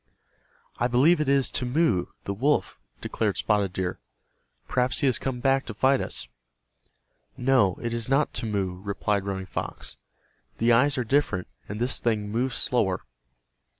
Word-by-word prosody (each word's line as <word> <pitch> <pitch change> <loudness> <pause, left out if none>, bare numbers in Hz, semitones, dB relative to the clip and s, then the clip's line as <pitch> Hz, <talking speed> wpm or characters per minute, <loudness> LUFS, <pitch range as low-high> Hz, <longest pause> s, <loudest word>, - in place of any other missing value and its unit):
"I 120 - +1
believe 145 +7 +4
it 145 - 0
is 140 -1 +2
Timmeu, 125 - +1 0.2
the 100 - -3
wolf," 140 +9 0 0.2
declared - - -1
Spotted 100 -3 +1
Deer. 90 -1 -3 0.7
"Perhaps 125 +3 0
he - - +2
has 130 -4 +2
come 130 -2 -3
back 135 0 +2
to 110 - -6
fight 130 +4 +3
us." - - -2 1.1
"No, 125 -7 +3
it 120 0 -2
is 115 +1 -3
not 140 +3 +2
Timmeu," 100 -5 -2
replied 100 0 -1
Running 95 -1 -3
Fox. - - -6 0.6
"The 115 +1 +3
eyes 135 +5 +4
are 125 - +1
different, 115 -7 0 0.2
and 105 +2 -5
this 125 +2 +1
thing 105 -3 0
moves 120 +2 -1
slower." 100 -8 +1
120 Hz, 150 wpm, -26 LUFS, 100-135 Hz, 1.1 s, believe